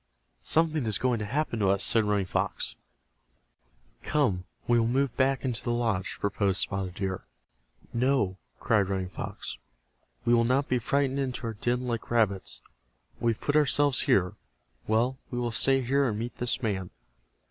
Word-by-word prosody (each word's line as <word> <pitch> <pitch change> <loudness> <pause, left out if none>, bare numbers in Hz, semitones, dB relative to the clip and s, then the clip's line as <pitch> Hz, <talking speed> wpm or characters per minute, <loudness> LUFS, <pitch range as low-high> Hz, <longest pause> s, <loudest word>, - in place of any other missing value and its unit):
"Something 155 -5 +1
is 105 -3 +1
going 125 0 +1
to 105 - -3
happen 130 +1 -1
to 100 - +2
us," 100 0 +2
said 110 -2 +3
Running 105 -2 +1
Fox. - - -1 1.3
"Come, 105 -12 0 0.2
we 120 -1 +4
will 115 - +2
move 130 +1 +1
back 135 0 +1
into 125 -2 -1
the - - -3
lodge," 115 -6 -1
proposed 100 -1 0
Spotted 95 -2 -2
Deer. 95 -2 -3 0.7
"No!" 120 -6 +1 0.2
cried 105 -4 +2
Running 95 -2 -2
Fox. - - -6 0.7
"We 120 - +4
will 115 -1 +5
not 130 +4 +2
be 125 - +1
frightened 140 +3 0
into 130 -3 -3
our 115 - -2
den 120 +4 0
like 115 -2 -3
rabbits. 105 -5 +1 0.6
We 115 -1 +2
have - - -15
put 145 - 0
ourselves 145 -2 +4
here. 95 - +2 0.5
Well, 120 +4 +1
we 120 - -4
will 120 -1 -1
stay 135 +4 +3
here 135 +2 +2
and 105 - -3
meet 115 +2 -4
this 125 +1 -1
man." 95 -4 -1
120 Hz, 170 wpm, -28 LUFS, 100-130 Hz, 1.3 s, will